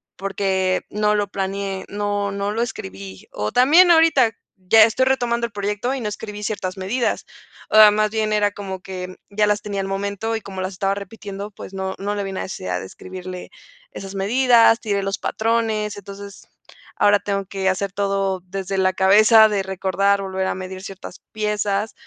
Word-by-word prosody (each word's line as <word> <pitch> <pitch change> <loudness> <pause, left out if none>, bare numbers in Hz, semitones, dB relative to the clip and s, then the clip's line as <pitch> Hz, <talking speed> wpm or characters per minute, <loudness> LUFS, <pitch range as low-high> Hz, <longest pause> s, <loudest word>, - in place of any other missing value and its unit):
porque, 190 -1 0
no 210 0 +1
lo 205 -1 0
planeé, 195 0 -4
no 205 0 -2
no 200 +1 -2
lo 225 +2 -1
escribí. 95 - -8
O 105 +1 -3
también 325 +8 +6
ahorita, 320 -8 +5 0.3
ya 190 +4 +6
estoy 245 +4 +1
retomando 240 -3 +1
el 235 - -7
proyecto, 205 +5 -2
y 270 - -4
no 215 - -2
escribí 210 0 -7
ciertas 195 -3 -3
medidas. 215 +6 -1 0.4
O 215 -1 +8
más 215 0 +1
bien 215 0 -1
era 210 -1 +3
como 190 -2 -7
que, 185 -1 -7
ya 210 +1 +1
las 210 0 +1
tenía 200 -1 -3
al 195 - -4
momento 200 +3 -2
y 220 - -3
como 190 -2 -7
las 185 +1 -3
estaba 195 +1 -1
repitiendo, 200 0 -7
pues, 195 - -10
no 190 0 -3
no 205 +1 -2
le 205 - -2
ví 195 - -5
la 190 - -4
necesidad 90 - -4
de 95 - -7
escribirle, 185 - -9 0.4
esas 195 - -8
medidas. 230 +3 +4
Tiré 200 -3 -1
los 195 0 -2
patrones. 220 -2 -1
Entonces 200 0 -10 0.5
ahora 205 0 +4
tengo 200 -1 -2
que 190 0 -3
hacer 190 +1 -1
todo 195 -1 -1
desde 195 +1 -4
la 185 0 +2
cabeza, 215 +4 +6
de 200 -2 0
recordar, 190 +1 0
volver 190 -1 -2
a - - -1
medir 185 0 -7
ciertas 195 -1 -9
piezas, 210 -1 -1
200 Hz, 180 wpm, -21 LUFS, 190-215 Hz, 0.5 s, O